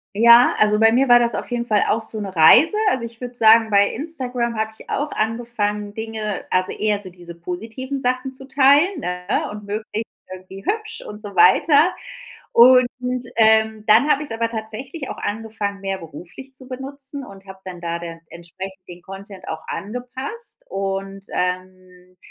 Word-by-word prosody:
Ja, 235 +3 +6
also 210 0 +3
bei 225 +1 +5
mir 265 +3 +3
war 240 -1 +7
das 235 -3 0
auf - - -5
jeden 240 -1 -2
Fall 210 -3 +2
auch 225 - 0
so 220 0 -1
'ne 195 -3 -6
Reise, 245 - +7
also, 245 -10 -1
ich 230 0 -12
würde 245 0 -7
sagen, 225 0 +5
bei 200 -1 +4
Instagram 250 -6 -2
habe 220 0 -1
ich - - -15
auch 295 +1 -2
angefangen, 215 -2 -2
Dinge 220 -2 -5
also, 185 0 0
eher 210 -1 0
so 190 - -9
diese 175 -1 -12
positiven 225 +11 -6
Sachen 255 +1 -2
zu 265 +1 -8
teilen, 285 +6 +3
ne? 180 -2 -2
Und 210 0 -8
möglichst 215 +2 -5 0.2
irgendwie 185 +1 -11
hübsch 440 +1 -2
und 210 0 -9
so 205 -2 -9
weiter. 350 -5 +5 0.6
Und, 250 +1 +7 0.5
ähm, 220 -1 +3
dann 225 +8 +5
habe 280 - +2
ich's 290 -6 -6
aber 230 0 -1
tatsächlich 235 +7 -6
auch - - -6
angefangen, 210 -1 -4
mehr 195 -1 -4
beruflich 175 - -11
zu 260 -1 -12
benutzen 270 +1 -7
und 195 0 -14
habe 190 0 -11
dann 180 -2 -8
da 170 0 -3
denn 165 -1 -8
entsprechend 185 +2 -10
den 175 0 -11
Content 195 +1 -11
auch 160 0 -6
angepasst 255 - -5
und, 195 0 -4
ähm, 185 0 -5
220 Hz, 175 wpm, -21 LUFS, 195-250 Hz, 0.6 s, war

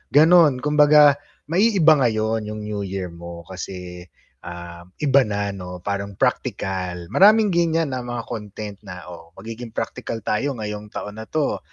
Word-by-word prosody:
gano'n. 155 -4 +6
Kumbaga 150 -1 +6 0.3
maiiba 175 -6 +4
ngayon 110 -2 0
'yong 105 0 -6
new 105 -1 -4
year 95 -2 -4
mo 85 0 -9
kasi, 90 -1 -8 0.4
ah, 85 0 -9 0.2
iba 135 -4 +4
na 100 -1 -2
'no, 90 -2 -8
parang 100 -1 -3
practical. 90 -3 -2
Maraming 210 +1 +5
gan'yan 165 -3 +1
na 130 - -2
mga 120 -1 -5
content 105 -2 -7
na, 90 -2 -9
"Oh, 85 0 -13
magiging 115 0 -9
practical 115 -2 -4
tayo 135 +7 -1
ngayong 105 -1 -6
taon 105 +1 -7
na 110 - -8
'to. 155 -2 -1
110 Hz, 150 wpm, -22 LUFS, 95-145 Hz, 0.4 s, gano'n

